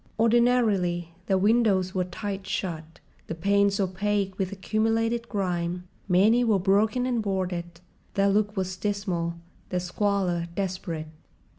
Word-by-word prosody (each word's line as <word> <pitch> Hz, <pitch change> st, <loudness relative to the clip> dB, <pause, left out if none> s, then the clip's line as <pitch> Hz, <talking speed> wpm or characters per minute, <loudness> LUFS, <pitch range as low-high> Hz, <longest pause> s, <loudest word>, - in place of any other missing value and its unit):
Ordinarily, 225 Hz, -7 st, +3 dB, 0.2 s
their 190 Hz, -, +3 dB
windows 200 Hz, -3 st, +3 dB
were 185 Hz, -1 st, 0 dB
tight 195 Hz, +1 st, -5 dB
shut, 160 Hz, -3 st, -4 dB, 0.3 s
the 165 Hz, -, -4 dB
panes 200 Hz, +3 st, +2 dB
opaque 195 Hz, +1 st, 0 dB
with 190 Hz, -1 st, -1 dB
accumulated 225 Hz, +4 st, 0 dB
grime—many 180 Hz, +3 st, +1 dB
were 220 Hz, -4 st, +3 dB
broken 210 Hz, +6 st, +2 dB
and 245 Hz, -3 st, 0 dB
boarded. 180 Hz, -4 st, -3 dB, 0.3 s
Their 200 Hz, 0 st, +3 dB
look 210 Hz, +1 st, +1 dB
was 185 Hz, -1 st, -1 dB
dismal, 185 Hz, -5 st, -2 dB, 0.3 s
their 180 Hz, -, 0 dB
squalor 180 Hz, -2 st, 0 dB
desperate. 180 Hz, -4 st, -3 dB
195 Hz, 120 wpm, -26 LUFS, 180-210 Hz, 0.3 s, Ordinarily